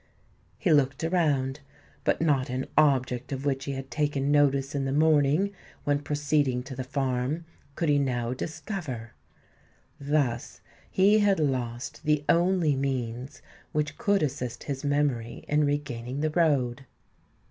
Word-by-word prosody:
He 175 - +2
looked 140 0 +2
around; 150 -6 +1 0.4
but - - +1
not 140 -4 +2
an 130 +1 -2
object 130 -4 +2
of 135 0 -4
which 135 -1 0
he 140 - -3
had 135 0 -6
taken 145 -2 0
notice 140 -1 +3
in 140 -1 -1
the 135 - -1
morning, 155 +5 +3 0.3
when 145 0 +1
proceeding 145 -3 0
to 130 0 -8
the 130 - -3
farm, 135 +3 -1 0.3
could 165 - -1
he 145 -1 +4
now 125 -3 -1
discover. 135 - -5 0.9
Thus 140 -5 -1 0.3
he 205 +3 +4
had 200 -4 +3
lost 125 -5 -2
the 150 -1 +1
only 170 -3 +3
means 130 0 -3 0.3
which 150 0 -1
could 200 -4 +2
assist 125 -4 -3
his 140 -1 -4
memory 140 -5 -1
in 150 0 +3
regaining 140 -2 -2
the 155 0 +1
road. 135 -6 +1
140 Hz, 140 wpm, -27 LUFS, 130-150 Hz, 0.9 s, he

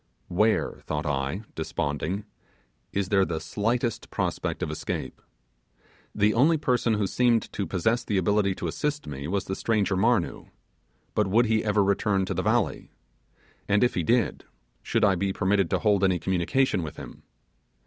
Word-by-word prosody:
Where, 105 +5 +1
thought 75 +2 -2
I, 75 +7 -2
desponding, 80 +5 -3 0.7
is 100 -2 -1
there 95 -1 +4
the 85 -3 -2
slightest 115 +8 -2
prospect - - -2
of - - -2
escape? - - -5 0.9
The 105 0 +3
only 155 +7 +4
person 125 -6 +1
who 105 -1 0
seemed 120 +2 +1
to 100 - -2
possess 110 +6 0
the 105 - -1
ability 100 +1 +2
to - - -4
assist 150 0 -2
me 70 -1 -6
was 95 +3 -1
the 95 - -3
stranger 105 -3 0
Marnoo; 100 -2 +1 0.7
but 105 -2 +1
would 115 +5 +4
he 110 -1 +1
ever 105 -1 +2
return 100 0 +1
to - - -3
the - - -1
valley? - - 0 0.8
and 105 +3 +3
if 125 - +2
he 90 - 0
did, 115 +5 +1 0.4
should - - +1
I 100 - +4
be 95 +2 -1
permitted 95 -1 +1
to - - +2
hold 105 -3 +2
any 95 -2 +3
communication 95 - +1
with 75 -3 -6
him? - - -10
100 Hz, 165 wpm, -26 LUFS, 95-110 Hz, 0.9 s, there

